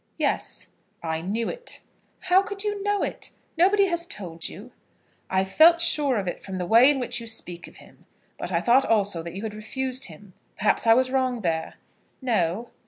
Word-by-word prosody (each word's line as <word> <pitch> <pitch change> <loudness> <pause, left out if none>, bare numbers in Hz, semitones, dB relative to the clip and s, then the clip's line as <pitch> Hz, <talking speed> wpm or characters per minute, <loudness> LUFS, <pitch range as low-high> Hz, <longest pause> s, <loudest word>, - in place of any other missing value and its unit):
"Yes." - - -2 0.3
"I 160 -1 -2
knew 215 +6 -2
it." - - -7 0.4
"How 370 +1 +4
could 395 0 -4
you 415 -1 -2
know 410 0 0
it? - - -5 0.3
Nobody 390 +4 +4
has 340 -2 0
told 170 - -4
you." 215 +8 -11 0.6
"I 190 0 +2
felt 315 - +5
sure 300 -6 +3
of 195 -3 -3
it 175 - -3
from 190 -1 -6
the 180 - -2
way 230 +8 +7
in 285 -2 +2
which 240 -1 -3
you 230 - -8
speak 180 -6 -6
of - - -16
him. - - -19 0.3
But - - -4
I - - +1
thought 250 +3 +4
also 200 -6 +1
that 170 +1 -8
you 195 - -6
had 220 -2 -4
refused 255 +5 -3
him. 185 +3 -12 0.2
Perhaps 210 +3 +1
I 225 - +7
was 255 +1 +1
wrong 255 -3 0
there?" 160 -3 -2 0.4
"No." 225 -4 -1
230 Hz, 195 wpm, -25 LUFS, 190-310 Hz, 0.6 s, way